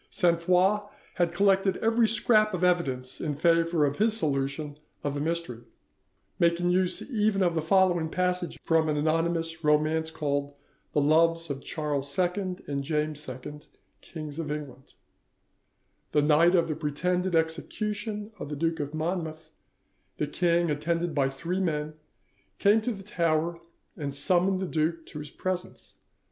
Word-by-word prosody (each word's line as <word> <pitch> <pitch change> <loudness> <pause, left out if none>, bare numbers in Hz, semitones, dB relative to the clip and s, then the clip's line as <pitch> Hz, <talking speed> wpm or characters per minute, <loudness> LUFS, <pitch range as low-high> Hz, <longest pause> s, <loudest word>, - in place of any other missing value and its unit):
Sainte 170 -2 +2
Foix 185 +4 +3 0.4
had 175 -2 +2
collected 195 +1 +3
every 225 0 +3
scrap 215 -2 +3
of 180 - -3
evidence 135 -8 0
in 150 -3 -2
favour 165 0 +3
of 140 0 -1
his 220 +1 +3
solution 145 -2 -2 0.2
of 145 - -1
the 145 - -3
mystery, 165 -7 -3 0.8
making 170 +1 +2
use 180 0 0
even 210 -4 +2
of 175 -2 +2
the 160 - 0
following 175 -1 +3
passage 180 -1 -1
from 160 -1 +2
an 150 - 0
anonymous 165 +1 0
romance 155 +1 +2
called 145 -3 -2 0.4
'The 145 - +3
Loves 165 +2 +3
of 140 0 -5
Charles 145 -2 -3
II 185 +1 0
and 140 -1 -3
James 150 0 -2
II, 130 +4 -8 0.4
Kings 155 -2 -8
of 155 -3 -3
England':— 145 -3 -7 1.2
"The 150 - +4
night 160 +4 +5
of 170 -2 +3
the 155 - -2
pretended 180 +4 -1
execution 210 +6 -2
of 145 - -6
the 150 - -3
Duke 165 +2 -1
of 145 +1 -4
Monmouth, 160 -1 -3 0.7
the 150 - 0
king, 170 +2 +1
attended 170 +3 -1
by 135 -2 +2
three 170 +7 -3
men, 155 -4 -1 0.6
came 210 +2 +4
to 245 - -1
the 195 -3 -7
Tower 170 -3 0 0.4
and 145 -3 -4
summoned 180 +7 +1
the - - -1
duke 165 0 -1
to 150 - -8
his 150 0 -7
presence. 185 +2 -5
165 Hz, 155 wpm, -27 LUFS, 150-180 Hz, 1.2 s, night